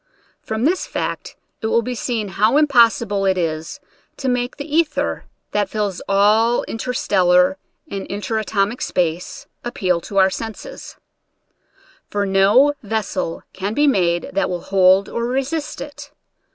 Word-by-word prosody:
From 220 Hz, +3 st, -2 dB
this 360 Hz, +5 st, +1 dB
fact -, -, -4 dB, 0.3 s
it 220 Hz, -, -1 dB
will 230 Hz, +1 st, +2 dB
be 250 Hz, -, -3 dB
seen 230 Hz, -3 st, -2 dB
how 215 Hz, +7 st, +2 dB
impossible 230 Hz, -9 st, +3 dB
it 190 Hz, -1 st, +2 dB
is 165 Hz, -, -3 dB, 0.4 s
to 270 Hz, -, -4 dB
make 245 Hz, -1 st, -1 dB
the 285 Hz, -, -5 dB
ether, 320 Hz, -3 st, 0 dB, 0.3 s
that 205 Hz, -2 st, 0 dB
fills 205 Hz, -4 st, -2 dB
all 215 Hz, +4 st, +3 dB
interstellar 190 Hz, -6 st, +2 dB, 0.3 s
and 195 Hz, -1 st, -5 dB
inter 210 Hz, +2 st, -2 dB
atomic 210 Hz, +2 st, -1 dB
space, 175 Hz, -1 st, -2 dB, 0.2 s
appeal 185 Hz, -7 st, -1 dB
to 200 Hz, -, -6 dB
our 190 Hz, 0 st, +5 dB
senses; 225 Hz, -, -7 dB, 1.1 s
for 205 Hz, 0 st, -1 dB
no 200 Hz, +9 st, +4 dB
ves 220 Hz, -1 st, -2 dB
sel 165 Hz, -, -3 dB
can 195 Hz, +3 st, -3 dB
be 295 Hz, -, +3 dB
made 175 Hz, -10 st, +1 dB
that 195 Hz, -, 0 dB
will 175 Hz, -1 st, -3 dB
hold 190 Hz, 0 st, +4 dB
or 235 Hz, -, -3 dB
resist 275 Hz, +4 st, -2 dB
it. 290 Hz, 0 st, -8 dB
210 Hz, 145 wpm, -20 LUFS, 190-245 Hz, 1.1 s, our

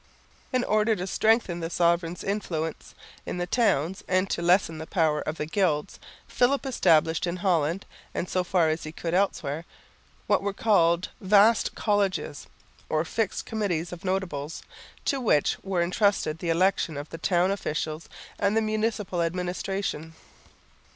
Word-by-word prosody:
In 255 Hz, -2 st, +1 dB
order 215 Hz, 0 st, +2 dB
to 180 Hz, -2 st, -4 dB
strengthen 215 Hz, -3 st, +2 dB
the 165 Hz, -1 st, -3 dB
sovereign's 170 Hz, 0 st, +1 dB
influence 165 Hz, -6 st, -3 dB, 0.3 s
in -, -, -5 dB
the 175 Hz, -, -1 dB
towns, 185 Hz, -, +1 dB
and 185 Hz, +1 st, +2 dB
to -, -, -1 dB
lessen 170 Hz, -2 st, +2 dB
the 160 Hz, -, -7 dB
power 155 Hz, -4 st, +1 dB
of 155 Hz, +1 st, -4 dB
the 150 Hz, -, -2 dB
Gilds, 160 Hz, -3 st, 0 dB, 0.3 s
Philip 270 Hz, +3 st, +1 dB
established 165 Hz, -, +3 dB
in 170 Hz, -, -2 dB
Holland, 175 Hz, -1 st, 0 dB, 0.3 s
and 180 Hz, -, -3 dB
so 185 Hz, 0 st, 0 dB
far 175 Hz, -3 st, +2 dB
as 155 Hz, +1 st, -2 dB
he 155 Hz, -, -6 dB
could 165 Hz, +1 st, -4 dB
elsewhere, 165 Hz, -5 st, 0 dB, 0.6 s
what -, -, +2 dB
were 200 Hz, 0 st, -2 dB
called 175 Hz, -5 st, +3 dB
"vaste 210 Hz, +3 st, +4 dB
Colleges" 200 Hz, -8 st, -1 dB, 0.4 s
or 155 Hz, +1 st, +1 dB
fixed 220 Hz, +3 st, -2 dB
committees 190 Hz, -7 st, -2 dB
of 170 Hz, -, -9 dB
notables, 175 Hz, -6 st, -3 dB, 0.4 s
to 275 Hz, -2 st, 0 dB
which 150 Hz, -, +2 dB
were 190 Hz, -3 st, 0 dB
entrusted 180 Hz, -4 st, +1 dB
the 170 Hz, -, -3 dB
election 165 Hz, -2 st, +1 dB
of 145 Hz, +1 st, -7 dB
the 165 Hz, -, -7 dB
town 180 Hz, +1 st, +2 dB
officials 155 Hz, -4 st, -3 dB, 0.3 s
and 200 Hz, +2 st, +2 dB
the -, -, +4 dB
municipal 215 Hz, -4 st, -1 dB
administration. 180 Hz, -1 st, -3 dB
180 Hz, 150 wpm, -26 LUFS, 165-200 Hz, 0.6 s, vaste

